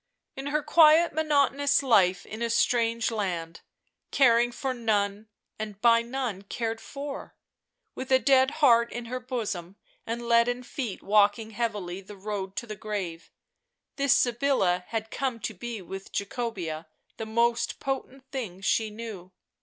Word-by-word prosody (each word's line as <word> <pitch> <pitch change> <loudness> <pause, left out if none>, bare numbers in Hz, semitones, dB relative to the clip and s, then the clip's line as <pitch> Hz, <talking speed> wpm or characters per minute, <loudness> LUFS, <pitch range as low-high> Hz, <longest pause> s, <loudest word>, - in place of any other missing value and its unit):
In 270 +1 -5
her 300 +1 0
quiet 320 +2 +6
monotonous 285 -2 +2
life 195 -8 +3
in 220 +2 -8
a 235 - 0
strange 230 0 +2
land, 175 -6 -3 0.5
caring 240 -2 +4
for 260 +2 -3
none, 210 -3 -1 0.3
and 210 -2 -6
by 230 0 +5
none 235 -5 -3
cared 225 +2 -4
for, 280 0 -7 0.6
with 260 - -6
a 260 - +7
dead 265 0 +4 0.2
heart 235 -2 +5
in 240 -1 -5
her 250 +2 -4
bosom 210 -8 -4 0.3
and 235 +1 -4
leaden 235 +1 +3
feet 245 -7 -5
walking 210 +2 +3
heavily 205 -5 -3
the 200 +1 -12
road 195 -1 -5
to 195 - -3
the 215 -2 -6
grave, 195 -6 -5 0.7
this 280 -1 +3
Sybilla 235 -8 +2
had 225 -1 -4
come 255 -3 -2
to - - -3
be 220 +1 -6
with 195 +3 -8
Jacobea 195 -7 -4 0.3
the 225 - -5
most 235 +1 +1
potent 270 0 -4
thing 225 -10 -5
she 220 +2 +1
knew. 210 -4 -8
230 Hz, 145 wpm, -27 LUFS, 200-255 Hz, 0.7 s, a